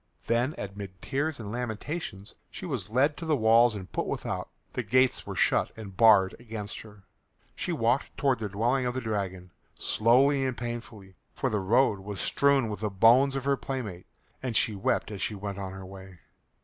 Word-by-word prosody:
Then 120 +6 +1
amid 100 -2 -7
tears 145 +5 -2
and 105 -3 -6
lamentations 120 - -5 0.2
she - - -8
was 125 - -3
led 135 +6 +2
to 170 - -6
the 155 - +3
walls 115 -1 +5
and 95 -3 -8
put - - -2
without. - - -3 0.2
The - - -1
gates 130 +3 +2
were - - -5
shut - - +2
and 100 -4 -9
barred 105 -4 +6
against 110 -3 -6
her. 105 -3 -15 0.5
She 180 - -3
walked 125 -4 0
towards 135 -5 +2
the 105 - -2
dwelling 120 +6 +1
of 125 - -2
the 130 - -2
dragon, 95 -5 -3 0.2
slowly 135 +5 +3
and 130 -2 -2
painfully, 115 -5 -7 0.2
for 130 - -1
the 105 - +1
road 105 +2 +3
was 100 0 -7
strewn 140 -3 +2
with 105 -2 -5
the 105 0 -1
bones 120 +8 +5
of 135 -1 -3
her 140 0 +2
playmates, 110 -12 -5 0.3
and 125 -4 0
she 110 - +2
wept 100 +2 -1
as 100 - -6
she 105 - -1
went 100 0 -5
on 95 -1 -5
her 95 0 -8
way. 95 -1 -11
115 Hz, 190 wpm, -28 LUFS, 100-130 Hz, 0.5 s, barred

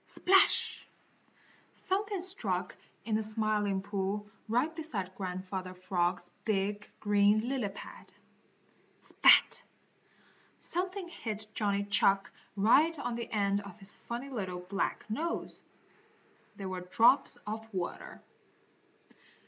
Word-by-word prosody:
Splash! 385 +1 +3 0.9
Something 400 0 -1
struck 375 +2 -1 0.3
in 225 - -2
the - - 0
Smiling 210 -2 0
Pool 200 +1 -2 0.2
right 255 +8 +1
beside 220 - -2
Grandfather 185 0 -5
Frog's 180 -1 -1
big, 205 0 -1
green, 205 +2 +3
lily 255 -6 -1
pad. 195 - -11 0.9
Spat! - - +5 1.0
Something 365 +1 -2
hit 220 -10 -4
Johnny 200 -2 0
Chuck 200 -1 +2 0.2
right 280 +11 +4
on 245 -4 -3
the 235 0 -4
end 200 -1 +1
of 200 -1 -11
his 195 -1 -5
funny 245 +4 -6
little, 185 -7 -4
black 195 +2 -2
nose. 310 +11 -3 0.9
They 195 - -7
were 185 -1 -4
drops 230 +9 +4
of 220 +1 -5
water. 185 -4 -5
210 Hz, 110 wpm, -31 LUFS, 195-245 Hz, 1.0 s, Spat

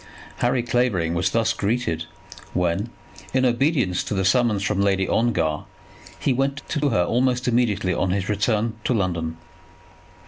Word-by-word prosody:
Harry 120 0 +1
Clavering 120 -9 +1
was 90 +1 +1
thus 115 +1 +1
greeted 100 -8 -1 0.5
when 90 +5 0 0.5
in 130 0 +3
obedience 125 - +1
to - - -3
the 95 -1 0
summons 105 -1 +2
from 100 -1 0
Lady 95 -1 +2
Ongar, 85 -10 0 0.5
he 135 - +1
went 135 +2 -1
to 150 -2 +1
her 90 -8 +2
almost 125 +5 +1
immediately 110 -6 +1
on 90 - 0
his 95 +1 -1
return 110 +2 0
to 125 - +2
London. 85 -5 -1
105 Hz, 145 wpm, -23 LUFS, 90-125 Hz, 0.5 s, in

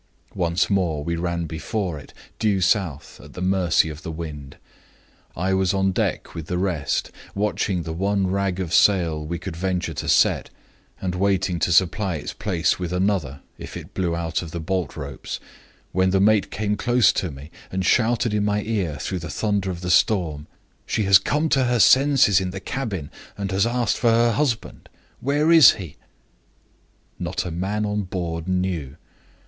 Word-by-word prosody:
Once 85 -2 +1
more 85 -7 0
we 85 +2 -2
ran 85 0 -2
before 85 +1 -3
it, - - -14 0.3
due 105 -4 +2
south, 90 - -1
at - - -14
the - - -8
mercy 90 -3 +2
of 75 0 -7
the 85 - -7
wind. 75 -3 -7 0.8
I 95 +3 0
was 95 0 +1
on 95 0 +2
deck - - -2
with 80 -2 -7
the 90 - -2
rest, 90 -7 -1 0.2
watching 100 -3 -1
the 80 0 -5
one 100 +3 0
rag 95 0 -1
of 85 -3 -3
sail 85 -5 +3
we 85 +3 -4
could 80 - -7
venture 90 -1 -2
to - - -4
set, - - +3 0.5
and 90 -1 -2
waiting 95 -1 0
to 90 - +1
supply 95 +1 +2
its 75 - -5
place 90 -5 0
with 90 -2 -3
another, 90 -7 -1 0.2
if - - -7
it - - -11
blew 85 -3 -1
out 85 -1 -2
of 85 - -7
the 85 - -5
bolt 90 -1 -3
ropes, 70 -2 -6 0.5
when 95 +1 +2
the 95 +1 +2
mate 105 0 +3
came 105 0 -1
close 120 +2 +3
to 90 - -2
me, 70 +2 -11 0.2
and 95 0 -2
shouted 120 +1 +2
in 105 -1 +1
my 105 0 0
ear 95 -10 -2
through 95 +6 -3
the 80 -2 -7
thunder 100 0 -1
of 90 -2 -5
the 90 0 -1
storm: 80 -7 +2 0.4
'She 110 - 0
has 100 -1 +7
come 150 +3 0
to 135 -3 +3
her 120 0 +1
senses 130 -6 +5
in 95 - -2
the 95 +1 -6
cabin, 100 - -4 0.3
and 100 -1 -3
has 95 +3 +2
asked 120 -2 0
for 120 - +2
her 115 +1 +4
husband. 115 -1 -2 0.3
Where 145 +4 +1
is 160 -7 +9
he?' 90 -8 -9 1.2
Not 90 +1 -3
a 90 - -4
man 100 +5 -2
on 105 0 -1
board 85 -3 -4
knew. 90 -7 -2
95 Hz, 185 wpm, -23 LUFS, 85-105 Hz, 1.2 s, is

